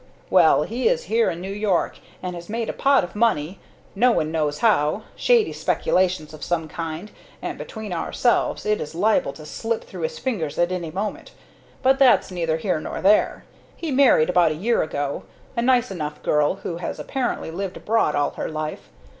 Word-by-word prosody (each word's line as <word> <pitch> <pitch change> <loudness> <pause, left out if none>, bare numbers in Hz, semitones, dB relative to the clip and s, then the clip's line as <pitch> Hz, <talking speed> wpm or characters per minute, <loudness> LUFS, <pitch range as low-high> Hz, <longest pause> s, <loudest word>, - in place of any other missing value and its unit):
"Well, 160 -5 +5
he 240 - 0
is - - 0
here 230 0 +2
in 170 - -5
New 190 +2 -5
York, 205 -3 0 0.2
and 180 -1 -3
has 170 +1 -9
made 230 +1 -2
a - - -2
pot 275 -1 +3
of 175 +2 -7
money 195 -6 +1 0.3
no 245 +5 +4
one 155 -8 0
knows 150 -2 0
how. 210 -4 +2
Shady 475 -4 +3
speculations 180 -4 0
of 155 - -9
some 165 -2 -1
kind, 165 +5 -6 0.3
and, - - -4
between 220 -4 -7
ourselves, 235 +7 0
it 210 0 +1
is 150 +2 -6
liable 205 -5 +2
to 155 - -11
slip 225 +8 -3
through - - -9
his 480 0 -3
fingers 195 - -3
at 175 +1 +2
any 175 -3 -3
moment. 200 +6 -5 0.5
But 265 0 +4
that's 260 -7 +5
neither 165 -3 -1
here 170 -1 -1
nor - - -5
there. 205 +2 +3 0.3
He 330 -3 -4
married, 260 - +5
about 175 -3 +4
a - - -2
year 225 +9 +1
ago, 145 -2 -2 0.3
a 235 - +1
nice 245 -2 +3
enough 150 -5 -5
girl, 150 +3 +2
who 170 - -3
has 175 - -4
apparently 250 -10 -3
lived 190 +2 -4
abroad 220 -8 +1
all 145 - +1
her - - -4
life. 155 0 -5
185 Hz, 190 wpm, -23 LUFS, 160-230 Hz, 0.5 s, Well